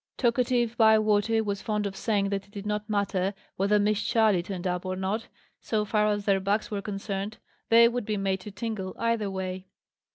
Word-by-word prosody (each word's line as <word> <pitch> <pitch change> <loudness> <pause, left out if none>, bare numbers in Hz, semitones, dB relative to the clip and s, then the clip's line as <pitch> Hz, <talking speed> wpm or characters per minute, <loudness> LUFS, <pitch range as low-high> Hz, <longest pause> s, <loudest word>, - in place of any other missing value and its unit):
Talkative 240 -1 +1
Bywater 220 0 +4
was 200 -1 -3
fond 210 -1 -1
of 195 -1 -4
saying 200 -1 0
that 195 -1 -2
it - - -24
did 205 -1 -7
not 210 +1 -2
matter 200 -2 0 0.2
whether 200 +2 +2
Miss 210 +1 +2
Charley 220 -6 +3
turned 185 0 -6
up 180 -1 -1
or 185 0 -3
not, 190 +4 -2 0.3
so 215 -2 -1
far 210 0 +2
as 205 -1 0
their 195 -2 +3
backs 200 +3 -1
were 205 -1 -2
concerned: 200 +1 -4 0.3
they 235 +1 +8
would 240 -1 -2
be 215 -1 0
made 195 -1 0
to 195 - -9
tingle, 200 -2 -4
either 230 -3 0
way. 190 0 -5
205 Hz, 195 wpm, -27 LUFS, 195-220 Hz, 0.3 s, they